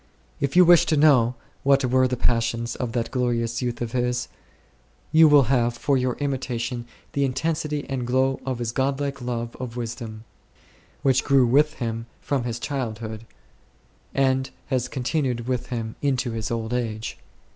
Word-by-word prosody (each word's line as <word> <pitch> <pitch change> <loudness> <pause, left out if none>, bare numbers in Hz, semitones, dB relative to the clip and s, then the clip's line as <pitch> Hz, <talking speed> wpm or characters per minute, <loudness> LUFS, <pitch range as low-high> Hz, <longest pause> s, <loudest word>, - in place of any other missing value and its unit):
If 140 +1 -1
you 180 0 +8
wish 175 -1 +6
to 155 - +2
know 130 -5 +5 0.3
what 140 -1 +3
were 130 +1 +3
the 125 0 -2
passions 115 0 0
of 125 -3 -4
that 115 -2 -1
glorious 120 -2 0
youth 120 -1 -2
of 115 - -5
his, 125 0 -1 0.8
you 160 0 +7
will 145 -2 +7
have 120 -1 +1
for 140 +3 +1
your 125 -1 0
imitation 125 -4 -3 0.3
the 140 - +1
intensity 150 +2 -1
and 130 -3 -3
glow 130 +1 +2
of 130 -1 -2
his 120 -1 -2
god 135 +3 0
like 140 -2 -3
love 120 -1 -3
of 125 -2 -6
wisdom, 115 -2 -5 0.8
which 130 -2 +3
grew 135 -3 +4
with 145 +5 +3
him 115 -3 -4
from 135 -4 -1
his 120 -1 -2
childhood, 115 -5 -4 0.9
and 130 -1 +2 0.2
has 130 -3 0
continued 125 -3 -1
with 125 -2 -1
him 115 -3 -4
into 130 -3 0
his 110 -1 -3
old 115 0 -2
age. 115 -3 -3
125 Hz, 165 wpm, -24 LUFS, 115-135 Hz, 0.9 s, you